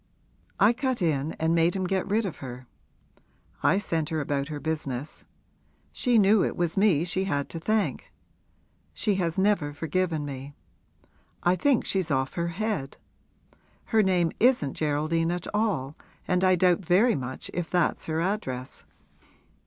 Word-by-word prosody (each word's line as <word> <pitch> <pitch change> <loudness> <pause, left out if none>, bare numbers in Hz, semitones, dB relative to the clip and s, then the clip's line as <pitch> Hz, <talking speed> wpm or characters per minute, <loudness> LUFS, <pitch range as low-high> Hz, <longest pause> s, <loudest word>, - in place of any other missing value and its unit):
I 205 +4 +6
cut 260 0 -1
in 155 -2 0
and 160 +1 0
made 170 +2 +3
him 190 - -1
get 190 0 -1
rid 215 +2 +1
of 185 - -5
her 125 -1 -8 1.0
I 190 - +3
sent 165 -6 -1
her 160 - -1
about 140 -1 -1
her 150 -2 -5
business. 150 -3 -4 0.7
She 245 -2 +2
knew 205 -1 +5
it - - -1
was 175 -2 0
me 190 -6 +3
she 185 +2 0
had 145 -7 -1
to 165 - -5
thank. 215 +5 -1 0.8
She 210 - +1
has 170 0 -1
never 190 -7 +1
forgiven 160 0 -1
me 140 0 -7 0.9
I 175 +1 +4
think 260 +6 +2
she's 190 -4 0
off 135 -2 0
her 170 0 -1
head. 185 -5 -3 1.0
Her 220 - +6
name 180 -4 +2
isn't 240 - +3
Geraldine 155 +2 0
at 175 0 -3
all 195 -11 0 0.3
and 180 0 +1
I 185 0 +5
doubt 180 -1 +3
very 200 +8 +4
much 130 -5 -5
if 175 -2 -3
that's 175 -3 0
her 160 0 -1
address.' 135 -10 -3
170 Hz, 155 wpm, -27 LUFS, 150-195 Hz, 1.0 s, I